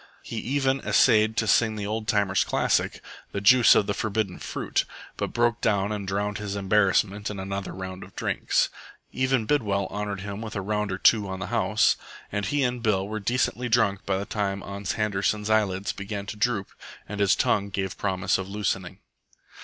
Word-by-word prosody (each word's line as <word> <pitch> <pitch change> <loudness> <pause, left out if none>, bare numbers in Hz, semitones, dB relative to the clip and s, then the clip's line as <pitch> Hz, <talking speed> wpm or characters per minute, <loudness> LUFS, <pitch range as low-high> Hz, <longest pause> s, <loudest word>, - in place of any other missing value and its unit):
He - - -6
even 135 0 0
essayed 110 -3 +3
to 110 - +2
sing 110 0 +3
the 105 -1 -4
old 110 +1 -3
timer's 100 -3 +2
classic, - - 0 0.3
"The 100 - -1
Juice 120 +4 +7
of - - +4
the 100 - -1
Forbidden 110 -4 -2
Fruit," - - -2 0.3
but - - -3
broke 120 0 +1
down 100 -2 +1
and 100 -2 -4
drowned 100 +1 -2
his 100 -1 -4
embarrassment 100 +1 +2
in 105 -2 -6
another 95 0 -4
round 95 0 -7
of - - -15
drinks. - - 0 0.4
Even 130 -3 +1
Bidwell 105 -8 +1
honoured 105 -2 -3
him 100 +1 -6
with 110 -2 -6
a 100 - -1
round 105 0 -1
or 95 - -2
two 105 0 +4
on 95 - -4
the - - -5
house; - - +3 0.3
and 100 -1 -2
he 145 +4 +1
and 125 -1 -1
Bill 100 -4 +1
were 110 +1 -4
decently 120 +3 0
drunk 110 -4 +2
by 95 -1 +1
the 100 - -3
time 100 -2 -2
Ans 100 -1 -4
Handerson's 105 0 0
eyelids 100 -2 +1
began 100 0 -5
to 110 - -6
droop 105 -2 0 0.4
and 105 0 -6
his 100 -2 +4
tongue 100 -1 +1
gave 95 -1 -3
promise 95 -1 0
of 95 0 -5
loosening. 95 -2 -2
105 Hz, 190 wpm, -26 LUFS, 100-110 Hz, 0.4 s, Juice